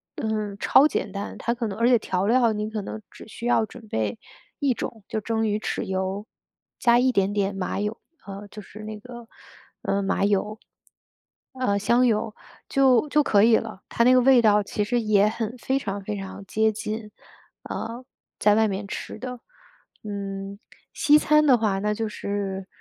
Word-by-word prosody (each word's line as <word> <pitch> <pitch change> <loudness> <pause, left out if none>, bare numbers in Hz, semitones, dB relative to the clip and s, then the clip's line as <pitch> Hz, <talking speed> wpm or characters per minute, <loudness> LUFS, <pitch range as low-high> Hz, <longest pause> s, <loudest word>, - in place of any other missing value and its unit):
嗯， 215 -2 -3
超 280 +6 +6
简 215 - -3
单。 200 +1 -6
它 235 - -1
可 235 -1 -3
能 200 -1 -5
而 230 +1 +3
且 245 -2 +5
调 185 -2 -1
料 235 +1 +4
你 210 0 -3
可 220 -1 -3
能 220 - -6
只 - - -13
需 230 +2 -8
要 240 -2 +3
准 225 +1 -13
备 110 - -2 0.4
一 275 -3 +2
种， 225 -2 -6
就 220 - -2
蒸 225 +1 -1
鱼 210 0 0
豉 - - -3
油， 190 +2 -3 0.5
加 235 -1 +5
一 255 +1 +3
点 195 -4 +1
点 200 -1 0
麻 195 0 -3
油， 210 +2 -3 0.3
呃， 200 +1 -8
就 215 - -10
是 210 - -13
那 215 0 -7
个， 240 +1 -11 0.6
呃， 200 - 0
麻 195 0 0
油。 205 +1 0 1.0
呃， 255 -6 0
香 235 +5 +3
油， 215 -1 0 0.3
就 265 -1 +4
就 300 +1 +4
可 205 -7 +4
以 225 0 +6
了， 190 - -6
它 235 - +1
那 250 - +6
个 255 - +6
味 255 -1 +6
道 210 -2 +4
其 205 +1 -2
实 240 +4 0
也 210 -2 +3
很 225 +1 -4
非 265 +3 0
常 200 -5 -4
非 210 +1 -4
常 195 0 -7
接 220 +2 +2
近， 215 0 -5 0.5
呃， 235 +3 -5 0.4
在 210 0 +4
外 220 0 +4
面 200 0 -3
吃 - - -6
的。 250 -1 -6 0.6
嗯， 200 -1 -5 0.4
西 300 0 +5
餐 300 0 +4
的 265 -4 +6
话 210 -4 0
那 210 +1 0
就 220 0 -3
是 195 -2 -4
215 Hz, 205 characters per minute, -25 LUFS, 200-235 Hz, 1.0 s, 超